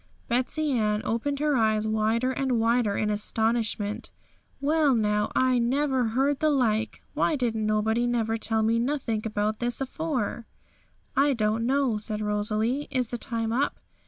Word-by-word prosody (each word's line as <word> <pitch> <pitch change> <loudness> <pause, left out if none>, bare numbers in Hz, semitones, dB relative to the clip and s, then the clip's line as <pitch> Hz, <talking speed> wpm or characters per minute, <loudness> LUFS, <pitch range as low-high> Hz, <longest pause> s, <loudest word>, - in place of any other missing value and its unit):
Betsey 270 +5 0
Ann 215 -4 +1
opened 280 +6 -1
her 295 0 +1
eyes 220 -2 +2
wider 220 +4 +1
and 260 0 -1
wider 230 -2 +2
in 210 0 0
astonishment. 215 0 -1 0.5
'Well, 295 -1 +3
now, 210 -2 +1
I 255 -1 +3
never 260 +1 +1
heard 275 +1 +2
the 310 - +3
like! 225 -6 0
Why 320 - +1
didn't 225 -5 -1
nobody 220 +3 +1
never 225 -2 0
tell 220 0 0
me 225 +1 +2
nothink 235 -4 -1
about 215 +1 -1
it 240 0 -1
afore?' 270 -5 -3 0.7
'I 280 +1 +4
don't 225 0 0
know,' 265 -5 +1
said 210 0 -3
Rosalie. 215 +6 -1
'Is 255 -4 -1
the 240 - -4
time 225 -1 -2
up?' 270 +4 0
230 Hz, 155 wpm, -26 LUFS, 215-265 Hz, 0.7 s, I